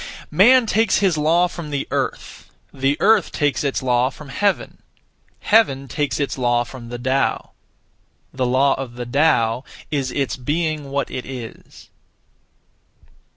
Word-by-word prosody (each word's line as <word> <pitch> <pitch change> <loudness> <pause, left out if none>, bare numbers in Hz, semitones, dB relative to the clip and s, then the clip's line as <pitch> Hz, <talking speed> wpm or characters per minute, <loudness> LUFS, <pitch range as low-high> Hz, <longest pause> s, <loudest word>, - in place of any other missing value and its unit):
Man 235 +10 +6
takes 220 -1 +2
his 195 -5 +2
law 160 +4 +3
from 170 -3 -8
the 140 -2 -3
Earth; - - -4 0.2
the 135 +1 0
Earth 210 -3 +3
takes 145 -1 0
its 140 -2 -1
law 125 0 +2
from 150 0 -12
Heaven; 200 +8 -1 0.6
Heaven 140 -12 +3
takes 145 +2 -2
its 140 -2 -2
law 120 -1 +2
from 120 -1 -11
the 120 - -5
Tao. 130 +2 -1 0.8
The 130 -1 -1
law 135 +2 +3
of 120 -3 -8
the 120 0 -5
Tao 120 -3 +2 0.3
is 140 -3 -1
its 140 -1 -2
being 150 +2 -2
what 140 0 -2
it 130 -1 -5
is. 125 -4 -10
140 Hz, 145 wpm, -20 LUFS, 130-160 Hz, 0.8 s, Man